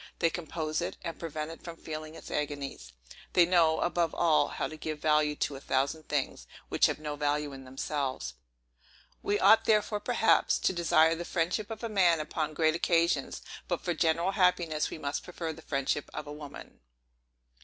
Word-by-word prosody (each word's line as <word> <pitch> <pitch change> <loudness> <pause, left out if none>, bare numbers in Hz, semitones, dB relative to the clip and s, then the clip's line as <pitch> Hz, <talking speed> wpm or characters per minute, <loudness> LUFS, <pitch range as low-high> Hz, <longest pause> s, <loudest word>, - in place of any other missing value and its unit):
They 165 - +2
compose 160 -1 -3
it, 175 - -4
and 165 - -5
prevent 155 -1 -4
it 165 - -11
from 170 -1 -8
feeling 155 0 -7
its - - -10
agonies. 140 - -4 0.4
They 175 - +6
know, 170 -3 +3
above 175 -1 0
all, 155 -3 +3
how - - -3
to 155 - -8
give 155 0 -4
value 150 0 +2
to 145 - -2
a - - -7
thousand 140 +5 -1
things, 145 -3 -2 0.2
which - - +4
have - - -2
no 150 -1 -5
value 145 0 -1
in 135 -1 -10
themselves. 130 - -3 0.9
We 205 - 0
ought 210 +4 +6
therefore, 210 -1 +2
perhaps, 225 0 +3
to - - +1
desire 165 -2 +4
the 170 +1 -4
friendship 180 +5 -1
of 225 0 -7
a - - 0
man 180 -6 +3
upon 155 0 -3
great 155 0 +3
occasions; 170 0 +1 0.2
but, - - -1
for 175 - -1
general 170 +3 +1
happiness, 180 -5 +2
we - - -6
must 145 -1 -3
prefer 170 -2 -5
the - - -12
friendship 140 0 -1
of 150 - -4
a 145 - -7
woman. 150 -1 -10
160 Hz, 185 wpm, -30 LUFS, 150-175 Hz, 0.9 s, They